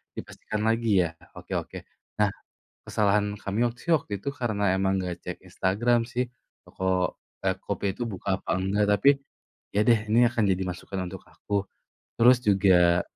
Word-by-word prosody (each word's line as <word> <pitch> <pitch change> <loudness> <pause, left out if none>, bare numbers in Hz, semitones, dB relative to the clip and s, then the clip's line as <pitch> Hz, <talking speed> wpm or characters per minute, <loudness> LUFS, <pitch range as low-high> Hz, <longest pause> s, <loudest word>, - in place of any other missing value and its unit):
dipastikan 105 0 -5
lagi 110 -4 +3
ya? - - -3 0.3
Oke - - -8
oke. - - -6 0.4
Nah, 105 -1 +4 0.6
kesalahan 105 0 +1
kami 105 +5 0
waktu 120 +1 -8
sih - - +6
waktu 115 - -9
itu - - -2
karena 105 -7 0
emang 95 0 +1
gak 90 -1 -4
cek - - -5
Instagram 120 +6 +1
sih, 125 0 -2 0.4
toko 95 -1 -1 0.3
eee, - - +2
kopi - - -4
itu 120 - -3
buka 95 -1 -2
apa - - -1
enggak. 100 +2 +1
Tapi, 105 +8 +5 0.7
ya 105 - +3
deh 115 -2 +5
ini 120 +2 +5
akan 115 -3 0
jadi 95 0 +1
masukan 95 +2 -6
untuk 95 0 -9
aku. 100 -1 -3 0.6
Terus 125 +2 +7
juga 95 -4 +4
100 Hz, 165 wpm, -26 LUFS, 95-115 Hz, 0.7 s, Terus